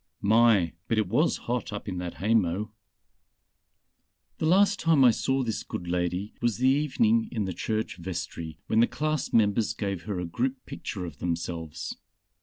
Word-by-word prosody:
My, 110 Hz, -5 st, +4 dB
but 115 Hz, -, 0 dB
it 110 Hz, -3 st, +2 dB
was 150 Hz, -, +2 dB
hot 120 Hz, -1 st, -2 dB
up 105 Hz, 0 st, -6 dB
in 90 Hz, -2 st, -3 dB
that 90 Hz, -1 st, -5 dB
haymow!... 105 Hz, 0 st, +1 dB, 1.7 s
"The 155 Hz, -, +1 dB
last 200 Hz, +4 st, +4 dB
time 165 Hz, -7 st, +4 dB
I 125 Hz, -, +8 dB
saw 135 Hz, +4 st, 0 dB
this 110 Hz, -3 st, -2 dB
good 90 Hz, -, -6 dB
lady 90 Hz, +3 st, -1 dB
was 120 Hz, -3 st, +1 dB
the 130 Hz, +2 st, +3 dB
evening 220 Hz, -, +2 dB
in 110 Hz, -3 st, -1 dB
the 95 Hz, -, -3 dB
church 110 Hz, +4 st, -2 dB
vestry 85 Hz, -3 st, -5 dB
when 110 Hz, -, +2 dB
the 120 Hz, -, +5 dB
class 155 Hz, -1 st, -2 dB
members 110 Hz, 0 st, +2 dB
gave 100 Hz, -5 st, -3 dB
her 100 Hz, -4 st, -3 dB
a 90 Hz, -, -2 dB
group 130 Hz, +10 st, -2 dB
picture 95 Hz, -3 st, -5 dB
of 75 Hz, -5 st, -9 dB
themselves. 85 Hz, -1 st, -4 dB
110 Hz, 170 wpm, -27 LUFS, 90-130 Hz, 1.7 s, I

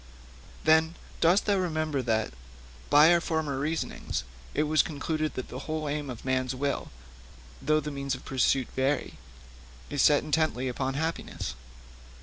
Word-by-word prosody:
'Then, 160 Hz, +1 st, +4 dB, 0.2 s
dost 175 Hz, +4 st, +4 dB
thou 205 Hz, -, +3 dB
remember 155 Hz, -6 st, 0 dB
that, 110 Hz, -, 0 dB, 0.6 s
by 150 Hz, +4 st, +7 dB
our 170 Hz, -, +3 dB
former 155 Hz, -5 st, -1 dB
reasonings, 155 Hz, -, -2 dB, 0.3 s
it 150 Hz, -, +3 dB
was 155 Hz, 0 st, +4 dB
concluded 155 Hz, +1 st, -2 dB
that 130 Hz, -, -5 dB
the 125 Hz, -, -6 dB
whole 155 Hz, -1 st, -2 dB
aim 145 Hz, -1 st, -2 dB
of 125 Hz, -1 st, -7 dB
man's 130 Hz, 0 st, 0 dB
will, 140 Hz, +1 st, -2 dB, 0.7 s
though 155 Hz, +2 st, +3 dB
the 150 Hz, 0 st, -4 dB
means 140 Hz, -1 st, -2 dB
of 130 Hz, -, -12 dB
pursuit 130 Hz, -1 st, +2 dB
vary, 135 Hz, +2 st, 0 dB, 0.7 s
is 145 Hz, -2 st, +1 dB
set 145 Hz, -1 st, +5 dB
intently 155 Hz, -4 st, +1 dB
upon 130 Hz, +1 st, -2 dB
happiness?' 160 Hz, +3 st, -3 dB
145 Hz, 145 wpm, -28 LUFS, 130-155 Hz, 0.7 s, by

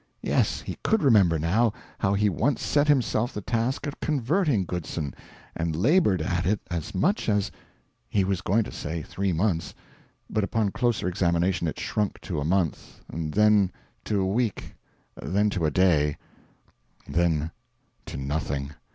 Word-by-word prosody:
Yes, -, -, +1 dB
he -, -, -7 dB
could 220 Hz, -4 st, +2 dB
remember, 100 Hz, -, +5 dB
now, 100 Hz, +9 st, +2 dB, 0.3 s
how 95 Hz, +1 st, +2 dB
he 105 Hz, +1 st, +3 dB
once 115 Hz, -, 0 dB
set 145 Hz, 0 st, +2 dB
himself 120 Hz, -4 st, +2 dB
the -, -, -2 dB
task 120 Hz, +6 st, -1 dB
of 145 Hz, -, -5 dB
converting 145 Hz, -, +1 dB
Goodson, 85 Hz, -5 st, -4 dB, 0.4 s
and 85 Hz, -1 st, -1 dB
laboured 105 Hz, -, +3 dB
at 90 Hz, +1 st, 0 dB
it 105 Hz, +1 st, +2 dB
as 85 Hz, -3 st, -4 dB
much 190 Hz, -, +1 dB
as 105 Hz, -2 st, +1 dB, 0.6 s
he 100 Hz, -, +2 dB
was 95 Hz, -1 st, -1 dB
going 105 Hz, +5 st, +2 dB
to -, -, -8 dB
say 80 Hz, +1 st, -4 dB
three 95 Hz, +4 st, -2 dB
months; 85 Hz, -1 st, 0 dB, 0.5 s
but 105 Hz, -, 0 dB
upon 105 Hz, 0 st, 0 dB
closer 120 Hz, -6 st, 0 dB
examination 85 Hz, -1 st, +1 dB
it 75 Hz, -, -4 dB
shrunk 105 Hz, -2 st, -1 dB
to 85 Hz, -5 st, -3 dB
a -, -, -1 dB
month, 85 Hz, 0 st, -1 dB
then 100 Hz, +5 st, +3 dB, 0.3 s
to 105 Hz, -2 st, 0 dB
a -, -, +1 dB
week, 110 Hz, +2 st, -1 dB, 0.5 s
then 100 Hz, +7 st, +1 dB
to 85 Hz, -6 st, 0 dB
a -, -, +2 dB
day, 75 Hz, -4 st, +3 dB, 0.9 s
then 80 Hz, +1 st, +1 dB, 0.6 s
to -, -, -6 dB
nothing. 70 Hz, 0 st, -2 dB
95 Hz, 155 wpm, -26 LUFS, 85-110 Hz, 0.9 s, remember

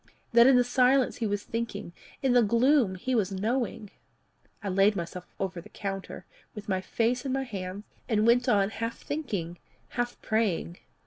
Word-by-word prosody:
that 235 Hz, +1 st, +8 dB
in 265 Hz, -, +7 dB
the 250 Hz, -, +5 dB
silence 255 Hz, +1 st, +3 dB
he 230 Hz, -, -1 dB
was 205 Hz, 0 st, -2 dB
thinking 225 Hz, -6 st, -4 dB, 0.3 s
in 265 Hz, -2 st, +3 dB
the 245 Hz, -, +6 dB
gloom 235 Hz, -1 st, +3 dB
he 255 Hz, +8 st, -3 dB
was 205 Hz, -5 st, +1 dB
knowing? 215 Hz, +1 st, -2 dB, 0.7 s
I -, -, -3 dB
laid 195 Hz, +3 st, +4 dB
myself 175 Hz, 0 st, -5 dB
over 185 Hz, -2 st, -3 dB
the -, -, -15 dB
counter, 195 Hz, -1 st, -6 dB, 0.3 s
with 210 Hz, -, -8 dB
my 190 Hz, -2 st, 0 dB
face 235 Hz, +5 st, 0 dB
in 270 Hz, -, -3 dB
my 270 Hz, +1 st, 0 dB
hands, 195 Hz, -4 st, -6 dB, 0.3 s
and 215 Hz, -2 st, +2 dB
went 240 Hz, +1 st, +4 dB
on 200 Hz, 0 st, +3 dB
half 230 Hz, +1 st, -4 dB
thinking, 200 Hz, -, -4 dB, 0.3 s
half 245 Hz, 0 st, -3 dB
praying. 205 Hz, -6 st, 0 dB
220 Hz, 175 wpm, -28 LUFS, 195-245 Hz, 0.7 s, that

